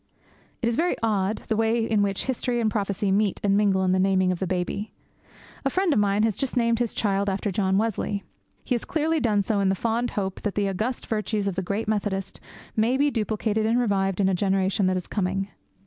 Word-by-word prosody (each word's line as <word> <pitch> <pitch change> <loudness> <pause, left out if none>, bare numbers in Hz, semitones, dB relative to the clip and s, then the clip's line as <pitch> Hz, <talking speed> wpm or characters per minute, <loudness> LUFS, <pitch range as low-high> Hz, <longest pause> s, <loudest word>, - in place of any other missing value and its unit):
It - - +2
is 235 - +1
very 350 +2 +2
odd, 210 -2 0
the 220 - +1
way 225 +1 +1
in 220 -2 +2
which 200 -1 0
history 250 -1 -1
and 220 -2 +1
prophecy 200 -1 -1
meet 200 0 +1
and 200 -1 +3
mingle 200 -2 +3
in 185 - +2
the 185 - +2
naming 185 -1 +3
of 180 - -3
the 190 - -1
baby. 185 +4 -2 0.7
A 270 - +2
friend 370 +2 +1
of - - +2
mine 205 +1 +2
has 220 -3 +1
just 270 +2 -2
named 235 -1 +2
his 240 -2 -1
child 200 -1 +1
after 195 +1 -1
John 190 0 +1
Wesley. 205 -2 -1 0.4
He - - -1
has 240 - -1
clearly 320 -2 0
done 210 -6 +2
so 205 +1 0
in 195 -1 +2
the 190 - +2
fond 230 +5 0
hope 190 -2 -3
that 210 - -2
the 205 -1 +1
august 215 +6 -2
virtues 215 -2 -1
of 195 - 0
the 190 - -2
great 200 +4 -3
Methodist 205 -3 -2 0.4
may 230 +4 +2
be 285 +1 +2
duplicated 220 -1 0
and 230 +2 +2
revived 195 -5 0
in 195 - +3
a 190 - +2
generation 190 +1 +1
that 185 0 +1
is 180 - -4
coming. 195 0 -2
205 Hz, 225 wpm, -25 LUFS, 195-225 Hz, 0.7 s, and